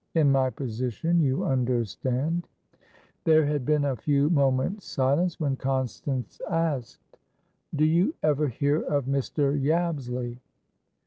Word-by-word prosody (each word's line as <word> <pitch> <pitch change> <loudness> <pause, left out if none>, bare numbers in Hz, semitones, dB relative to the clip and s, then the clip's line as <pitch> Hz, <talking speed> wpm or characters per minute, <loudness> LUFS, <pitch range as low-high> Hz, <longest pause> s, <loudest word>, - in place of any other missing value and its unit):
In 150 -4 +4
my 135 -1 +3
position, 130 - -1
you 135 -4 +1
understand" 130 - -1 0.8
There 155 -1 +5
had 145 -3 -1
been 150 -1 +2
a 135 -2 0
few 145 +5 +1
moments' 140 +6 +1
silence, 145 +7 +1
when 140 -4 0
Constance 130 -2 -3
asked: 160 -7 -3 0.6
"Do 150 +1 +3
you 175 - +2
ever 150 -1 +2
hear 145 +5 0
of 140 -3 -1
Mr. 140 +1 0
Yabsley?" 135 -6 -1
140 Hz, 120 wpm, -26 LUFS, 130-155 Hz, 0.8 s, There